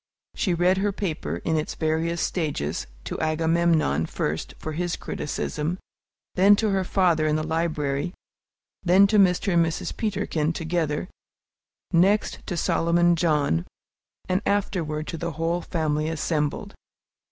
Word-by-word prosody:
She 180 -5 0
read 180 +2 +3
her 205 +1 +1
paper, 155 - -3
in 160 -1 +1
its 155 - -3
various 160 +2 0
stages, 140 - -2 0.2
to - - -5
Agamemnon 160 - +2
first, 75 +2 -3
for 155 - -5
his 175 +2 -2
criticism, 150 +3 -3 0.6
then 195 +2 +6
to 215 0 0
her 190 -1 +1
father 175 -4 +2
in 150 - +2
the 155 0 -1
library, 160 -1 -1 0.7
then 190 +2 +6
to 210 +1 +3
Mr. 185 0 +3
and 170 -1 +5
Mrs. 165 0 -3
Peterkin 170 -7 -1
together, 160 -1 -1 0.9
next 195 +5 +3
to 175 - -3
Solomon 170 +1 +3
John, 150 - +1 0.6
and 185 +1 +1
afterward 170 -7 -1
to 165 - -5
the 170 -1 -3
whole 165 +3 -1
family 155 -2 -1
assembled. 150 -2 -2
165 Hz, 135 wpm, -25 LUFS, 155-180 Hz, 0.9 s, then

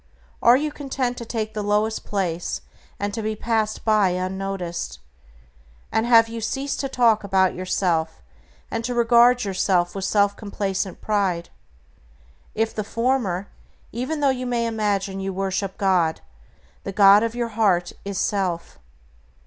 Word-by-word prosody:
Are 240 +2 +6
you 300 +2 -2
content 265 -4 -3
to 235 - -6
take 220 -1 -3
the 215 - -3
lowest 210 +2 0
place, 175 -4 -2 0.4
and 205 0 -2
to 225 - -3
be 215 0 -2
passed 220 -1 -1
by 215 -3 +4
unnoticed? 185 -1 -3 0.9
And 220 +1 +1
have 230 -2 +6
you 230 0 -6
ceased 270 +5 -2
to 275 - -2
talk 230 -5 +3
about 190 -2 +2
yourself 175 -3 -1 0.5
and 230 - -2
to 245 +1 -2
regard 240 +1 +5
yourself 185 -3 +1
with 195 - -5
self 200 +1 +2
complacent 195 -3 -3
pride? 190 -5 0 1.1
If 225 0 0
the 215 - -3
former, 230 -5 -1 0.4
even 260 +7 -3
though 280 - +4
you 255 -1 -3
may 240 -1 0
imagine 205 -3 -1
you 195 0 -3
worship 195 0 -2
God, 180 -5 +1 0.6
the 195 - -4
god 200 +1 +7
of 230 +1 -2
your 240 -1 -2
heart 195 -6 +1
is 200 -1 -4
self. 180 - -2
205 Hz, 150 wpm, -23 LUFS, 190-230 Hz, 1.1 s, god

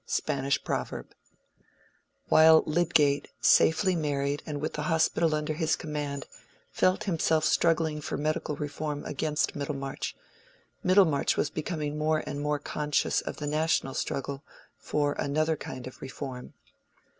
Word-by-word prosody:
—Spanish 135 0 0
Proverb. - - -4 1.2
While 160 0 +7
Lydgate, 155 -3 +2
safely 185 +3 +4
married 145 -2 -1
and 150 -2 -3
with 155 - -3
the 150 - -3
Hospital 160 0 +2
under 150 0 -2
his 160 0 +1
command, 145 -3 -4 0.5
felt 185 +1 +2
himself 160 -4 +1
struggling 160 -2 +2
for - - -3
Medical 155 0 -1
Reform 150 0 -4
against 150 +1 -1
Middlemarch, 140 -2 -4 0.7
Middlemarch 180 -7 +3
was - - 0
becoming 150 -2 -3
more 155 0 +1
and 145 - -4
more 150 0 0
conscious 150 0 0
of - - -6
the 150 - -5
national 150 -2 0
struggle 140 +1 -3 0.3
for 145 -1 -1
another 155 +3 +1
kind 130 -4 -7
of 130 - -10
Reform. 130 -1 -7
150 Hz, 130 wpm, -28 LUFS, 145-160 Hz, 1.2 s, While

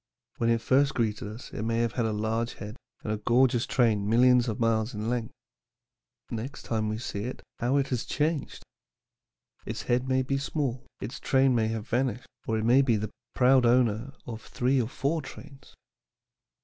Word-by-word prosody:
When 115 - +1
it 115 -1 +2
first 135 +2 +3
greeted 110 -3 -1
us 110 +4 -9
it - - -4
may 115 +1 0
have 115 -1 +1
had 115 -1 0
a - - -1
large 110 +2 -1
head 105 +2 -8 0.3
and 105 - -1
a - - -2
gorgeous 120 +2 +2
train 105 -5 +2
millions 125 +2 +5
of 110 - -3
miles 115 0 +1
in 105 +3 -2
length. 120 -2 -2 1.0
Next 120 +5 -5
time 110 -2 -1
we 110 - -2
see 105 -3 -4
it, 125 - -6 0.2
how 125 +4 +2
it 140 -1 +1
has 125 -3 -1
changed! 150 -1 -2 1.0
Its - - -5
head 125 +1 0
may 130 0 +2
be 135 +1 -1
small, 135 -3 -2
its 120 +7 -6
train 135 -1 +3
may 115 -2 +2
have 110 0 -3
vanished, 125 -1 -1 0.2
or 110 - +1
it 110 - -1
may 125 +4 +6
be 125 -4 +2
the 105 0 -3 0.2
proud 130 0 +5
owner 120 +1 +2
of 115 -2 -6
three 130 +3 +1
or 115 - -2
four 155 +5 -1
trains. 135 0 -12
120 Hz, 190 wpm, -28 LUFS, 110-130 Hz, 1.0 s, may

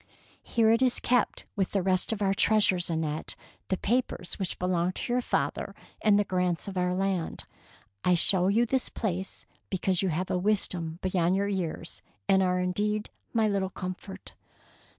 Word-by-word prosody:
" - - -28
Here 225 -1 +2
it 230 +2 +3
is 255 -2 +4
kept 245 -3 +1
with 195 -2 -1
the 195 -2 +1
rest 185 +2 +2
of 210 -2 -1
our 195 0 +3
treasures, 195 -4 +3
Annette, 160 -2 -2 0.3
the 190 - 0
papers 220 -5 -1
which 190 -3 -2
belong 180 0 0
to 240 - -3
your 250 - +2
father - - -2 0.3
and 210 -2 +5
the 205 - +3
grants 180 -2 -1
of 195 - -5
our 180 0 +1
land. 190 -3 -1 0.6
I 180 - +4
show 185 +2 +4
this 240 +5 +2
place 190 -3 -3
to - - -24
you - - -37
because 190 -1 0
you 190 - +1
have 175 +3 -2
a 180 - +1
wisdom 180 -5 0
beyond 185 -1 +2
your 200 +1 +1
years, 185 -5 -3 0.3
and 190 0 +4
are 180 -1 +2
indeed 210 +4 -1 0.2
my 225 -2 +2
little 195 -2 0
comfort. 185 +1 -7
190 Hz, 180 wpm, -28 LUFS, 180-210 Hz, 0.6 s, and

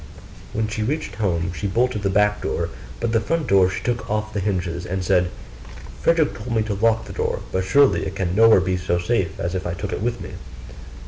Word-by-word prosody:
When 110 0 0
she 110 0 -3
reached 115 -4 -2
home, 90 -4 0
she 100 - -3
bolted 115 +2 +1
the 100 - 0
back 105 +1 +2
door, - - -2 0.3
but 115 -1 -1
the 115 - +3
front 165 +5 -1
door 95 -2 +4
she 95 - -5
took 120 -1 -2
off 105 0 -2
the 105 - -1
hinges, 90 -3 -2
and 95 +1 -3
said, 90 -1 +3 0.7
'Frederick 165 -3 +3
told 115 +2 -5
me 110 - +2
to 105 -1 -2
lock 110 +2 +2
the - - -8
door, - - -1
but 95 - 0
surely 140 +9 +4
it 95 - -6
can 90 -3 -1
nowhere 110 -2 +7
be 95 0 0
so 90 -1 0
safe 90 -2 -1
if 90 +1 -2
I 85 - -3
take 100 +2 -4
it - - -3
with 120 +1 -1
me. - - -7
105 Hz, 220 wpm, -22 LUFS, 95-115 Hz, 0.7 s, nowhere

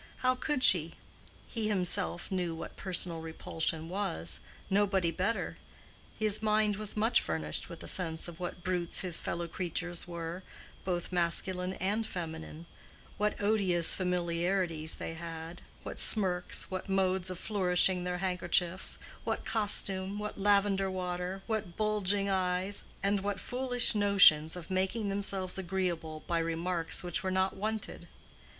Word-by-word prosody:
How 255 - +5
could 255 +1 -1
she? 165 -6 +4 0.5
He 225 -2 -2
himself 185 -2 0
knew 180 -3 -1
what 160 - -7
personal 180 -3 +1
repulsion 160 0 -2
was—nobody 190 - 0
better; 200 +7 -2 0.6
his 215 -1 +3
mind 215 -1 +2
was 215 0 -2
much 225 +3 +4
furnished 80 -2 -1
with - - -9
a - - -8
sense 165 -3 0
of 170 -1 -10
what 175 0 -5
brutes 180 -2 0
his 180 -3 -3
fellow 170 0 -3
creatures 175 0 -3
were, 170 +1 -5 0.4
both 175 -2 -2
masculine 180 +1 +1
and 200 +5 -1
feminine; 160 -2 -6 0.5
what 210 0 0
odious 195 -5 +4
familiarities 175 -2 0
they - - -5
had, 165 0 -7 0.2
what - - -4
smirks, 180 -4 +1
what 185 +1 -4
modes 190 -1 +1
of 185 - -5
flourishing 180 -2 +2
their 180 0 -2
handkerchiefs, 180 -1 0 0.3
what - - -2
costume, 200 -2 +2
what 210 -1 -5
lavender 200 -1 +3
water, 180 +1 -3
what 215 -6 -3
bulging 205 -2 +1
eyes, 185 +1 0 0.2
and 200 +1 +2
what 200 0 -2
foolish 245 -1 +2
notions 195 -7 +6
of 180 0 -8
making 190 +3 0
themselves 195 -2 0
agreeable 170 -4 -2
by 170 -1 0
remarks 165 +1 0
which 175 -2 -2
were 190 - -2
not 190 +1 +1
wanted. 215 +2 -4
185 Hz, 135 wpm, -31 LUFS, 170-200 Hz, 0.6 s, notions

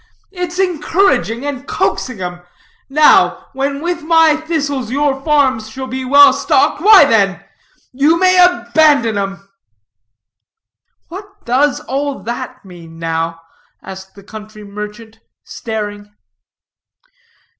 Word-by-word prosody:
It's 360 -2 -6
encouraging 320 - 0
and 280 -1 -6
coaxing 255 -7 -3
'em. 180 -1 -6 0.5
Now, 300 +2 +3
when 275 +1 -3
with 345 0 -3
my 325 -1 +3
thistles 290 -6 -3
your 275 +1 -1
farms 265 -8 +1
shall 260 +4 -7
be 260 +1 -5
well 280 +2 +6
stocked, - - 0
why 410 -7 +7
then 200 -7 0 0.5
you 290 +6 +2
may 365 0 +4
abandon 285 -6 +2
'em!" 195 0 -5 1.6
"What 395 +3 -12
does 260 +3 +1
all 275 +2 -3
that 255 +2 -7
mean, 170 -3 -14
now?" 165 0 -4 0.4
asked 190 0 -11
the 200 - -15
country 215 +1 -12
merchant, 210 +2 -10 0.2
staring. 205 -2 -7
260 Hz, 115 wpm, -15 LUFS, 210-305 Hz, 1.6 s, why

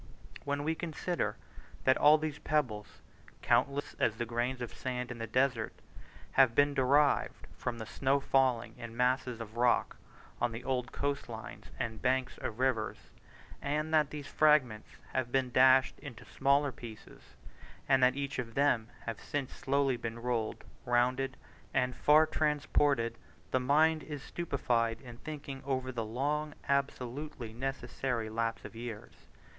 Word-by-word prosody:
When 145 0 -1
we 160 +2 +1
consider 175 +2 -2 0.5
that 130 - +5
all 150 +1 +7
these 155 -1 -4
pebbles, 125 -11 -2 0.4
countless 140 +1 +1
as 110 - +2
the 120 - -2
grains 120 +2 -1
of 120 -2 -5
sand 125 -1 -4
in 120 - -7
the 115 - -3
desert, 125 -1 +1 0.6
have 130 -4 +5
been 145 +2 +4
derived 140 +2 +2
from 120 -1 -3
the 110 - -6
slow 135 +4 +1
falling 130 -4 +2
of 115 - -5
masses 125 0 0
of 115 0 -8
rock 120 0 +2 0.4
on 120 -1 +1
the 115 +2 -6
old 125 -2 -1
coast 140 -2 -2
lines 110 -1 -8
and 110 -2 -4
banks 130 0 0
of 110 - -4
rivers, 125 -4 -1 0.5
and 150 +2 -1
that 155 -2 +4
these 150 -2 -6
fragments 145 -7 +3 0.2
have 130 -2 -1
been 130 -1 +1
dashed 130 +1 +5
into 130 -7 -10
smaller 140 +1 +2
pieces, 115 -4 -12 0.5
and 135 -1 +4
that 125 0 +5
each 140 -1 -3
of 115 -2 -5
them 130 -6 +3 0.2
has 115 -2 -3
since 145 -3 -3
been - - -11
slowly 135 -2 +1
rolled, 115 -1 -3 0.2
rounded, 130 +2 +1 0.4
and 125 -1 +1
far 155 +2 +6
transported 145 -6 +1 0.3
the 130 - +3
mind 155 +5 +3
is 145 -3 -7
stupefied 120 -8 -1
in 120 -3 -11
thinking 140 -2 -7
over 130 -1 -2
the 120 -3 -3
long, 145 +7 -2
absolutely 140 -3 -2
necessary, 125 -2 -3
lapse 115 0 -2
of - - -9
years. 115 -2 -7
130 Hz, 150 wpm, -32 LUFS, 120-140 Hz, 0.6 s, all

